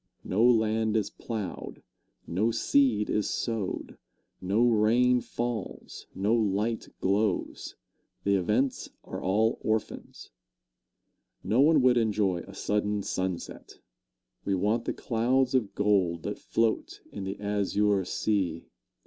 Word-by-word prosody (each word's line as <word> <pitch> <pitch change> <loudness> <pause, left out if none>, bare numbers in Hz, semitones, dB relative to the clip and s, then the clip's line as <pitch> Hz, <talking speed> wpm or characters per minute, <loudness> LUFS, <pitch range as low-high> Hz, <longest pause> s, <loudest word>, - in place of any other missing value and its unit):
No 105 +5 +1
land 110 -2 +3
is 105 -1 -1
plowed, 110 -6 -6 0.4
no 100 +7 0
seed 115 -1 +2
is 105 - 0
sowed, 110 -5 -3 0.4
no 105 +6 +2
rain 120 +3 +3
falls, 120 -4 -5
no 100 +4 +1
light 110 0 0
glows 100 0 -1 0.5
the 100 - +2
events 105 +8 0
are - - -7
all 110 +5 +1
orphans. 110 - -3 1.1
No 115 +5 +2
one 150 -2 +5
would 125 -1 +5
enjoy 105 -5 +1
a 100 - -11
sudden 105 0 -1
sunset 95 -2 -4 0.7
we 100 - 0
want 105 +5 0
the - - -1
clouds 125 +3 +1
of 120 -6 0
gold 95 -5 +1
that - - -4
float 115 -1 -1
in 100 - -6
the 95 +1 -5
azure 105 -1 +1
sea. 90 -4 -1
105 Hz, 120 wpm, -28 LUFS, 100-115 Hz, 1.1 s, one